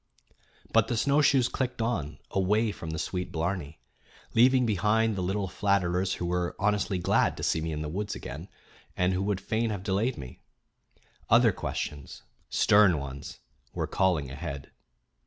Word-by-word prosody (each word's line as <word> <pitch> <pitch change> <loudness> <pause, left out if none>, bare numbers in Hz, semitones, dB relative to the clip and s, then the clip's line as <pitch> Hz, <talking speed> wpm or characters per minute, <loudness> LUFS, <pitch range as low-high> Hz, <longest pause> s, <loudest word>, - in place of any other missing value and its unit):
But - - +4
the 120 - -1
snowshoes 140 -1 +3
clicked 125 -2 -3
on, 115 -11 -2
away 105 +4 +2
from 85 -5 -8
the 80 - -3
sweet 90 +3 -3
blarney, 80 -2 -3 0.6
Leaving 125 +2 +5
behind 110 +1 +2
the 95 - -2
little 95 +2 -1
flatterers 95 -1 0
who 90 - -4
were 90 0 -1
honestly 100 -1 0
glad 90 - +1
to - - -6
see 80 - +1
me 80 0 -3
in 75 0 -3
the - - -4
woods 100 +6 -3
again, 75 +9 -8 0.5
and 90 +1 +2
who 90 - -1
would 100 -1 -1
fain 110 +4 -1
have 100 -3 -4
delayed 105 +6 0
me. 65 -4 -10 0.9
Other - - +6
questions, 70 -2 -5 0.3
stern 100 -5 +5
ones, 70 0 -7 0.3
were - - -1
calling 85 -8 0
ahead. 70 -2 -6
95 Hz, 155 wpm, -28 LUFS, 80-105 Hz, 0.9 s, Other